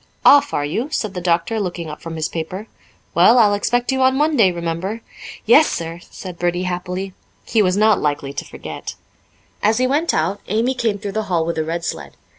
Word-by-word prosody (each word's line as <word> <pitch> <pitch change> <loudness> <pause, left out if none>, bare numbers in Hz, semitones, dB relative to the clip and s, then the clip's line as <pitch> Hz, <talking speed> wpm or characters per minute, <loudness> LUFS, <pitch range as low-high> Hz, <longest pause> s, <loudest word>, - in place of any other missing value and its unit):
"Off, 285 0 +7
are 145 - -1
you?" 225 - -2
said 215 -10 -2
the 180 - -4
doctor, 175 +5 +1
looking 175 -4 -3
up 150 - -8
from 165 -1 -6
his 160 -1 -1
paper. 175 +5 -5 0.5
"Well, 240 - +6
I'll 210 -4 +5
expect 245 +5 0
you 265 0 0
on 260 +1 +4
Monday, 290 -10 +3
remember." 175 +6 -3 0.4
"Yes, 280 +7 +6
sir," 165 0 -4
said 180 -3 -9
Bertie 175 +1 0
happily. 180 +1 -4 0.3
He 225 - +2
was 185 -1 +2
not 215 0 +4
likely 145 -2 -1
to - - -4
forget. - - -8 0.7
As 215 +2 +3
he 255 - +2
went 295 +6 +1
out 200 +1 -1
Amy 230 +6 +1
came 225 -5 -1
through 200 0 -5
the 220 +1 -2
hall 170 -3 +1
with 170 -1 -2
a - - +1
red 165 +1 -3
sled. - - -5
195 Hz, 205 wpm, -20 LUFS, 170-230 Hz, 0.7 s, Off